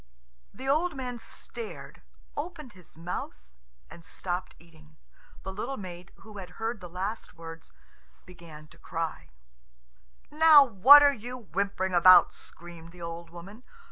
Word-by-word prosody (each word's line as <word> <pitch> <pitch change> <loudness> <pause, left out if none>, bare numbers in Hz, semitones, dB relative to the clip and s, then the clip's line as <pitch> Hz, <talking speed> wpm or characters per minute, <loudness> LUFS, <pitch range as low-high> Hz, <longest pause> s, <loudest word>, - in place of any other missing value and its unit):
The 260 +6 -9
old 315 +4 +1
man 250 -2 -6
stared, 455 - -9 0.3
opened 300 -5 -7
his 180 -4 -17
mouth, 115 - -7 0.4
and 170 - -14
stopped 180 +2 -5
eating. 155 -2 -21 0.5
The 190 - -6
little 240 +7 -5
maid, 180 -2 -10
who 215 -2 -11
had 180 -1 -11
heard 225 -1 -4
the 180 - -9
last 195 +6 -6
words, 165 -1 -11 0.5
began 165 -4 -13
to - - -19
cry, 165 - -5 1.0
"Now, 305 -1 +7
what 265 +6 +8
are 285 -1 +5
you 245 +1 -8
whimpering 195 -3 -3
about?" 180 +1 +7
screamed 170 -1 -13
the 180 - -14
old 170 0 -7
woman. 180 +7 -12
185 Hz, 140 wpm, -28 LUFS, 170-245 Hz, 1.0 s, what